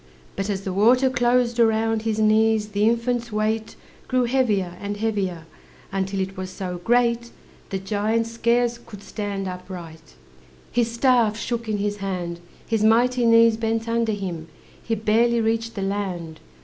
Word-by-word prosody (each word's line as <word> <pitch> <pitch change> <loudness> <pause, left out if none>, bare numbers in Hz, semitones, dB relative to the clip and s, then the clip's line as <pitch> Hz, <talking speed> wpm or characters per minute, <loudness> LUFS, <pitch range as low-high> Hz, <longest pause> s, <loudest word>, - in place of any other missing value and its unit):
But 195 +1 -3
as 195 -2 -1
the 190 - -3
water 250 +7 +4
closed 245 -1 +2
around 225 -1 +2
His 220 -1 -1
knees, 215 0 +3
the 205 +1 +2
infant's 235 0 -1
weight 215 +1 -1 0.3
Grew 255 -1 +2
heavier, 220 -8 +1
and 205 0 -4
heavier, 195 -6 -2 0.5
Until 195 0 -2
it 190 +1 -4
was 185 0 -5
so 185 -1 -5
great 235 0 +2 0.4
The 195 - -2
giant 210 +4 0
scarce 235 +1 +1
could 205 -4 -12
stand 200 -2 -4
upright, 180 - -9 0.6
His 235 -1 +1
staff 235 -2 +2
shook 230 0 -3
in 210 - 0
his 205 0 -2
hand, 180 -4 -4 0.3
His 225 -2 0
mighty 240 +2 +3
knees 230 -1 +6
bent 225 0 -1
under 230 -1 +1
him, 180 -5 -5 0.4
He 225 - -1
barely 225 +2 +2
reached 225 0 -1
the 195 - -3
land. 185 -5 -3
220 Hz, 155 wpm, -23 LUFS, 195-235 Hz, 0.6 s, knees